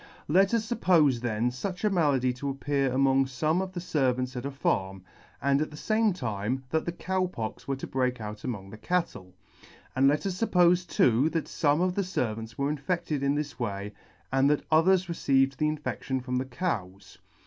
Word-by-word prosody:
Let 190 +5 +4
us 220 -1 -1
fuppofe 165 - +3
then 120 0 0
fuch 180 - -5
a 210 - +3
malady 140 -8 +2
to 140 +3 -4
appear 135 0 0
among 135 +1 +3
fome 155 +7 0
of 190 -1 -5
the 180 - -4
fervants 130 -6 0
at 125 +2 -3
a - - -3
farm, 95 -8 -1 0.4
and 140 +1 +2
at 155 - -1
the 150 - -11
fame 220 +4 +2
time 125 - -3
that 160 - 0
the 175 - -1
Cow 185 +1 -1
Pox 115 -10 -6
were 135 - 0
to 135 - -6
break 125 -1 -1
out 105 -1 -7
among 100 -6 -5
the 110 - -10
cattle 135 - -2 0.3
j - - -20 0.3
and 135 +1 +4
let 145 +5 +2
us 190 0 -3
fuppofe 180 -4 +3
too 130 +3 +3
that 165 -1 -2
fome 150 +3 +1
of 185 -1 +1
the 200 - 0
fervants 115 - -3
were 140 +1 0
infedted 150 -1 -2
in 140 +1 +1
this 145 -4 -4
way, 105 -3 -3 0.4
and 135 +1 +4
that 150 - +1
others 180 +4 +4
re 170 - -3
ceived 135 -3 +2
the 150 +2 +1
infedtion 140 -3 -3
from 125 0 -2
the 130 - -1
cows. 115 - -4
140 Hz, 205 wpm, -28 LUFS, 125-170 Hz, 0.4 s, Let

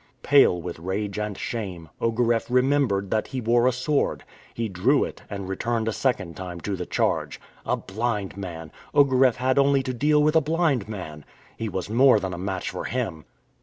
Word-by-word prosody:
Pale 135 - +5
with 90 -2 -6
rage 100 +3 -3
and 105 -2 -3
shame, 95 -8 -5
Ogareff 115 0 +1
remembered 125 -6 +2
that 110 - 0
he 130 - -4
wore 120 +1 +3
a - - +4
sword. 135 +4 -1 0.3
He 115 -1 -3
drew 110 +9 +2
it - - -6
and 100 -2 -5
returned 115 +4 -1
a 110 - 0
second 100 -12 -1
time 90 -2 -7
to 100 +2 -2
the 90 -1 -5
charge. - - -1 0.3
A - - +1
blind 105 -1 -3
man! 85 -5 -7 0.2
Ogareff 130 -4 +5
had 130 +2 +1
only 140 -1 +3
to 130 - -3
deal 150 +4 +3
with 155 +1 +2
a 160 - +6
blind 150 - 0
man! 80 -8 -7 0.3
He 115 - -4
was 95 -2 -4
more 120 +1 +5
than 95 -2 -4
a 90 - -6
match 95 -1 -3
for - - -5
him! 95 - -3
110 Hz, 190 wpm, -25 LUFS, 95-130 Hz, 0.3 s, a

